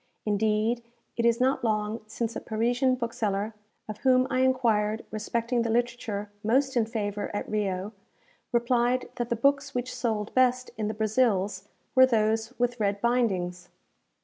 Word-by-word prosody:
Indeed 215 +2 +1 0.3
it 235 0 +2
is 235 0 +2
not 260 +1 +2
long 215 0 0
since 225 +1 -3
a - - -2
Parisian 245 +4 +1
bookseller, 220 -3 -2 0.3
of 215 -1 -6
whom 255 -1 +4
I 255 - +1
enquired 230 -5 +2
respecting 230 +3 -1
the 230 - -1
literature 225 -3 -1
most 265 +5 +2
in 230 -2 +2
favour 205 -3 -3
at - - -3
Rio, 200 -2 -2 0.6
replied 240 +1 +1
that 240 -1 -2
the 235 - +1
books 280 +3 +1
which 250 +1 -2
sold 220 -3 -2
best 255 0 +2
in 215 -2 -2
the 215 - -3
Brazils 210 -3 +1 0.3
were 260 0 +7
those 220 -1 +1
with 245 0 0
red 200 -1 0
bindings! 190 -7 0
230 Hz, 150 wpm, -27 LUFS, 210-245 Hz, 0.6 s, were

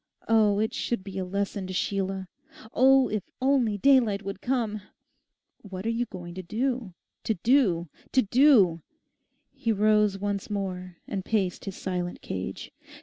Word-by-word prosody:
Oh, 215 -3 +4
it 220 +1 0
should 235 -5 -2
be 195 -1 -6
a - - -1
lesson 200 0 -3
to 185 - -5
Sheila! 190 0 -2 0.5
Oh, 265 +1 +5
if 210 -3 -3
only 255 -5 +2
daylight 230 -4 +3
would 195 0 -6
come! 230 -5 -1 0.8
'What 190 -1 -8
are 230 - +1
you 235 +1 -1
going 175 -4 -8
to 185 - -6
do—to 225 0 -3
do—to 200 - +1
DO?' 210 - +5 0.7
He 230 - -2
rose 210 -1 +3
once 200 0 -3
more 185 -3 -4
and 195 -2 -3
paced 195 -5 -1
his 195 - -5
silent 180 -1 -4
cage. 95 0 -5
205 Hz, 145 wpm, -27 LUFS, 185-230 Hz, 0.8 s, Oh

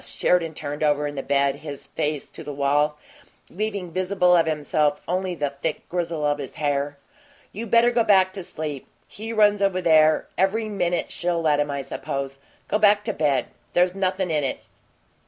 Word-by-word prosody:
Sheridan 165 -3 +1
turned 145 0 -5
over 150 -1 +2
in 145 - -3
the 135 - -3
bed, 140 0 +1
his 145 -2 -8
face 150 -1 -3
to - - -9
the 150 - -6
wall, 145 +2 +1 0.5
leaving 200 -3 -3
visible 180 0 +2
of 165 -2 +3
himself 150 -1 +1
only 185 +1 -1
the 145 -3 -2
thick 160 - -3
grizzle 170 -3 -2
of 145 0 +1
his 135 -3 -7
hair. 145 -1 -1 0.6
"You 230 +3 -5
better 235 +2 +5
go 235 -1 +3
back 190 -3 +4
to 190 -2 -6
sleep. 150 -5 -6 0.2
He 220 +2 -7
runs 210 -2 +4
over 195 -2 +2
there 155 -3 +4
every 215 +3 +1
minute 175 -4 -1
she'll 170 -1 -1
let 150 -2 +3
him, 145 0 0
I 140 -1 -2
suppose. 135 0 -5 0.3
Go 210 - +1
back 205 0 +5
to 215 0 -2
bed. 145 -6 +1 0.2
There's 180 0 +3
nothin' 185 -2 -1
in 150 -2 +1
it." 130 - -2
165 Hz, 185 wpm, -24 LUFS, 145-190 Hz, 0.6 s, better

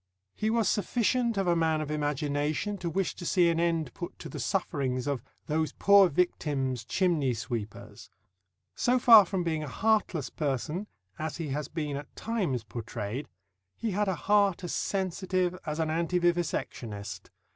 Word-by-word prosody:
He 215 - -1
was 225 -1 +2
sufficient 235 +1 +1
of 195 - +1
a 175 -1 +3
man 160 -1 +2
of 155 -1 -3
imagination 150 +5 -1
to 175 - -2
wish 190 +3 -1
to - - -9
see 175 0 +3
an 165 -1 +1
end 165 -6 0
put - - -7
to - - -8
the - - -7
sufferings 130 -3 -1
of 140 -3 -1 0.2
"those 155 0 -1
poor 200 -2 +6
victims, 140 -6 0
chimney 150 - +1
sweepers." 110 -2 -6 0.6
So 250 +1 +2
far 230 -4 +9
from 190 -1 -1
being 160 -2 -1
a 150 - -4
heartless 195 - 0
person, 150 - -2 0.3
as 155 0 -3
he 165 -4 -4
has 145 +1 -2
been 150 -3 -3
at 145 - -9
times 190 - -1
portrayed, 115 +3 -5 0.5
he 225 - -2
had 205 +2 0
a 190 - +1
heart 200 -3 +3
as 175 - -3
sensitive 185 -1 -1
as 150 0 -2
an 160 -1 0
anti 170 +2 +1
vivisectionist. 115 - -2
165 Hz, 165 wpm, -29 LUFS, 140-190 Hz, 0.6 s, far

